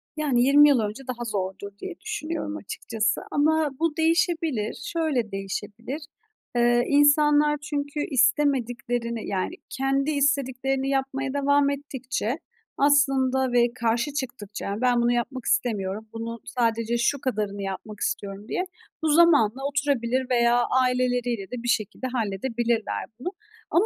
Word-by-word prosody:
Yani, 290 -6 +1
20 290 +3 +7
yıl 275 -4 +4
önce 215 +4 -3
daha 240 -1 -4
zordur 200 -1 -4
diye 360 -3 -7
düşünüyorum 330 - -4
açıkçası 215 - -2
ama 310 +1 +2
bu 330 -1 0
değişebilir. 320 -8 +1 0.2
Şöyle 290 -10 0
değişebilir. 205 +8 -5 0.5
Eee, 240 0 +4
insanlar 295 +1 +4
çünkü 290 -1 -3
istemediklerini, 245 -3 +1
yani, 195 - -2
kendi 275 +2 0
istediklerini 270 -1 0
yapmaya 270 0 -1
devam 285 0 +3
ettikçe 265 -2 -3 0.4
aslında 265 -2 +3
ve 240 -1 +3
karşı 235 +4 0
çıktıkça 220 -7 -4
"Ben 245 -1 +3
bunu 235 0 +3
yapmak 245 +1 -2
istemiyorum, 215 -4 -1
bunun 230 +1 -5
sadece 230 -1 0
şu 275 +3 +1
kadarını 210 -6 -2
yapmak 195 +2 -6
istiyorum." 200 +1 -3
diye 360 - -1 0.4
bu - - +2
zamanla 290 -7 +4
oturabilir 265 -3 0
veya 240 -1 +3 0.2
aileleriyle 245 -4 0
de 245 -1 -5
bir - - -4
şekilde 240 +2 -1
halledebilirler 230 +1 -1 0.2
bunu. 305 - -3 0.4
Ama 345 +7 +4
255 Hz, 125 wpm, -25 LUFS, 230-285 Hz, 0.5 s, 20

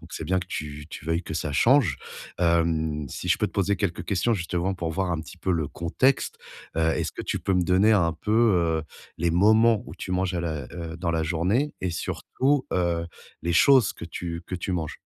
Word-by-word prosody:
Donc, - - -11
c'est - - -5
bien 95 +3 +1
que 90 - -7
tu 75 -3 -6
tu - - -9
veuilles 85 +2 0
que 80 - -6
ça 75 -2 -2
change. 130 - +4 0.4
Hem, 80 -3 +1
si - - -5
je - - +4
peux - - 0
te - - -10
poser 100 0 +1
quelques 95 -4 -2
questions 100 +4 +1
justement, 90 -1 -1
pour 85 -3 -3
voir 90 +2 -1
un 80 -2 -1
petit 80 - -11
peu 90 +1 -1
le 80 -4 -1
contexte? 125 +11 0 0.4
Heu, - - +2
est-ce 80 0 0
que - - -7
tu - - -2
peux 95 - -1
me 90 -1 +3
donner 95 +5 +4
un 85 -5 +3
peu, 95 +5 -6 0.5
heu, - - -8 0.4
les 85 +1 +1
moments 110 +5 +4
où - - -10
tu 95 - -7
manges 90 0 0
à 90 - -1
la 80 -4 -3
heu, 85 -1 -6
dans 85 -1 -2
la 80 -1 0
journée 90 - 0
et, 95 - 0
surtout, 130 - -1
heu, 85 -2 0 0.4
les 85 0 0
choses 130 - +5
que 85 - -9
tu 85 0 -5
que - - -5
tu 90 +1 -3
manges? 80 -4 -3
85 Hz, 225 wpm, -25 LUFS, 80-95 Hz, 0.5 s, choses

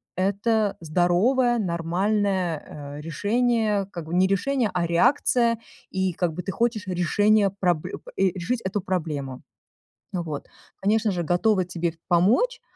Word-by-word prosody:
это 205 +3 +1
здоровое 195 - +2
нормальное, 175 -4 -1
э, - - -7
решение. 210 +4 +1
Как 170 -4 -6
бы 170 +2 -4
не 185 - +4
решение, 215 +4 0
а 175 -2 0
реакция, 235 +4 +3 0.3
и 190 -1 0
как 170 -1 -1
бы 180 - -4
ты 185 - -4
хочешь 225 -2 -1
решение 200 +3 +2
пробль 175 -5 0 0.2
и 190 - +2
решить 195 +6 -3
эту 190 +1 -2
проблему. 150 -8 -3 0.7
Вот, 165 -5 -4 0.3
конечно 215 +2 +2
же, 180 -3 -1
готова 185 +4 +2
тебе 170 -1 -2 0.2
помочь. 230 - +3
190 Hz, 130 wpm, -24 LUFS, 170-215 Hz, 0.7 s, не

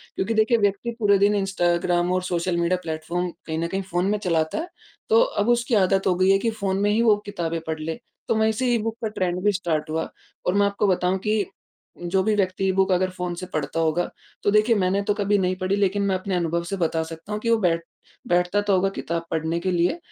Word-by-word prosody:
क्योंकि 190 +4 -1
देखिए 220 +2 +3
व्यक्ति 205 +2 0
पूरे 205 -2 +4
दिन 205 +1 +4
इंस्टाग्राम 175 -2 +1
और 185 - +1
सोशल 175 -1 -1
मीडिया 170 +2 +1
प्लेटफ़ॉर्म, 165 +3 -3 0.2
कहीं 160 -1 -3
न 170 - -1
कहीं 190 +3 -2
फ़ोन 180 -1 -1
में 210 - +1
चलाता 165 -5 0
है, 325 +2 -3 0.4
तो 455 +1 +6
अब 240 - 0
उसकी 240 0 +2
आदत 195 -1 +2
हो 185 - +3
गई 185 +1 +3
है 195 - +5
कि 230 - 0
फ़ोन 200 -3 -2
में 205 - +2
ही 220 +2 +2
वो 225 -3 +5
किताबें 170 -5 -3
पढ़ 160 0 -3
ले। 160 +6 -4 0.3
तो - - +1
मैं 220 0 +3
इसी, 220 +4 -1
ई - - +3
बुक 225 0 -2
का - - +1
ट्रेंड 185 -4 -2
भी 205 - +4
स्टार्ट 170 -6 -2
हुआ 160 +1 -2 0.4
और 180 - +2
मैं 200 0 +3
आपको 200 +1 0
बताऊँ 185 0 +1
कि 210 -1 +2 0.5
जो 175 +2 0
भी 220 - +2
व्यक्ति 190 -1 +1
बुक 190 0 +2
अगर 185 +1 +2
फ़ोन 180 -1 -4
से 185 - -6
पढ़ता 155 +1 -2
होगा, 165 +2 +1 0.3
तो 205 - +3
देखिए 215 +3 +4
मैंने 195 0 +1
तो 205 - +1
कभी 205 0 +1
नहीं 185 -1 0
पढ़ी 185 +1 +1
लेकिन 200 0 +1
मैं 195 -1 +1
अपने 185 0 -2
अनुभव 170 -1 0
से 195 +3 -4
बता 165 -2 0
सकता 165 +4 -9
हूँ 210 - -2
कि 230 - -1
वो 230 - +4
बैठ 170 -4 +1 0.5
बैठता 180 +3 +2
तो 205 -1 +1
होगा 190 +1 +3
किताब 170 -3 -4
पढ़ने 160 +1 -1
के 185 +2 -1
लिए 175 - +1
185 Hz, 240 wpm, -24 LUFS, 175-205 Hz, 0.5 s, तो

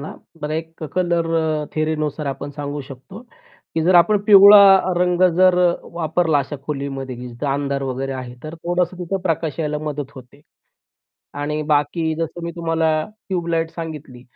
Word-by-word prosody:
ना, 145 - -7 0.3
बरं. 150 0 -4
एक 160 0 -6
कलर 175 -2 +1 0.5
थियरीनुसार 155 -1 -2
आपण 140 +1 -4
सांगू 145 0 -4
शक 135 - -8
तो, 195 +4 -9 0.5
की 160 - 0
जर 180 +2 +3
आपण 195 +5 +5
पिवळा 200 -2 +8
रंग 180 0 +1
जर, 185 -1 +5
अ, 175 -1 +3 0.2
वापरला 160 -1 +1
अशा 140 +2 -4
खोलीमध्ये, 135 -3 -4
की 125 +1 -8
जिथं 120 +4 -6
अंधार 140 0 -2
वगैरे 135 0 -3
आहे, 125 -2 -7
तर 155 +1 -7
थोडंसं 175 +2 -2
तिथं 180 +2 -3
प्रकाश 165 -4 -2
यायला 150 -1 -2
मदत 150 -2 -5
होते. 130 +1 -14 0.9
आणि 145 +1 -3
बाकी 160 +2 0
जसं 165 +1 -4
मी 170 - -3
तुम्हाला 165 -1 0 0.4
ट्यूब 180 -3 -2
लाइट 165 -1 0
सांगितली, 150 -7 -8
160 Hz, 165 wpm, -20 LUFS, 145-175 Hz, 0.9 s, पिवळा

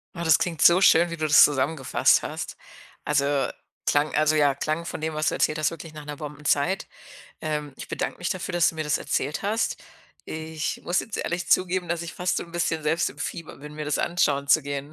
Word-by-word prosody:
Oh, 170 - -4
das 160 -1 +6
klingt 165 -4 -2
so 175 +2 +7
schön, 170 -2 +6
wie 170 - -4
du 155 - -1
das 150 -1 +8
zusammengefasst 140 -1 +2
hast. - - -6 0.5
Also 140 -1 +1 0.4
klang 145 +1 +2
also, 155 +1 +3
ja, 145 -2 +4
klang 155 +4 -2
von - - -5
dem, 160 0 -3
was 155 0 +1
du - - -3
erzählt 155 - +1
hast, 155 0 +1
wirklich 165 -1 -9
nach 150 -1 -9
'ner 145 0 -6
Bombenzeit. 150 +4 -1 0.6
Ähm, 150 -3 -3
ich - - -9
bedanke - - -3
mich - - -3
dafür, - - -3
dass 175 -1 +3
du - - -16
mir 155 -1 -3
das 150 - +1
erzählt 145 +3 -2
hast. 210 +3 0 0.5
Ich 160 0 -4
muss 175 - +1
jetzt 225 - -6
ehrlich 175 +1 -3
zugeben, 185 -1 +2
dass 170 0 -1
ich 170 -1 -7
fast 180 0 0
so - - -4
'n 170 - -13
bisschen 165 -2 -1
selbst 160 +3 +1
im - - -16
Fieber 165 -2 -6
bin, 150 +2 -10
mir 150 0 -5
das 150 - -1
anschauen 140 -5 +1
zu - - +5
gehen. 140 +1 -5
155 Hz, 225 wpm, -25 LUFS, 150-170 Hz, 0.6 s, das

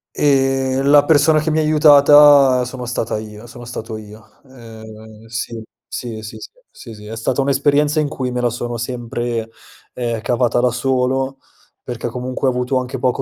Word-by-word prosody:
Ehm, 135 -1 +1
la 145 0 +6
persona 155 0 +4
che 155 +1 -2
mi 155 - +1
ha - - +2
aiutata 145 -3 +6
sono 125 0 -7
stata 115 -2 -3
io 110 +1 -11
sono 120 0 -12
stato 115 -2 -7
io. 110 0 -14
Ehm, 110 -3 -13
sì, 115 0 -5 0.3
sì, 115 -3 -6
sì, 110 +1 -9
sì, - - -10 0.2
sì, 115 - -12
sì, 105 - -13
è 110 +2 -7
stata 120 +4 -1
un'esperienza 145 +2 +1
in 150 - 0
cui 130 -3 -4
me 125 0 -3
la 120 - +1
sono 120 0 -5
sempre, 120 -1 -4 0.4
ehm, 115 -3 -3
cavata 120 0 0
da 125 0 +2
solo 130 +1 -1 0.5
perché 120 -1 -5
comunque 125 +2 -3
ho - - +3
avuto 125 +1 -1
anche 130 +1 -5
poco 125 -1 0
125 Hz, 175 wpm, -18 LUFS, 115-135 Hz, 0.5 s, la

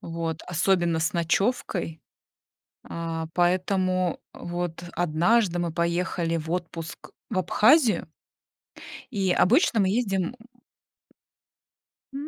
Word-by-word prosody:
вот, 165 -1 -4
особенно 175 -1 +1
с 160 0 0
ночевкой. 175 -1 -1 0.9
А, 165 -1 -4
поэтому 185 0 +1
вот 175 -1 -5
однажды 175 +4 +2
мы 170 -1 -1
поехали 170 0 -1
в 160 0 -5
отпуск 165 -2 -5 0.2
в 200 - -1
Абхазию 220 - +4 1.0
и 195 -5 0
обычно 230 - +3
мы 190 -2 +3
ездим, 195 -3 0
м, 170 - -5 1.8
м 285 +2 -5
175 Hz, 100 wpm, -26 LUFS, 165-195 Hz, 1.8 s, Абхазию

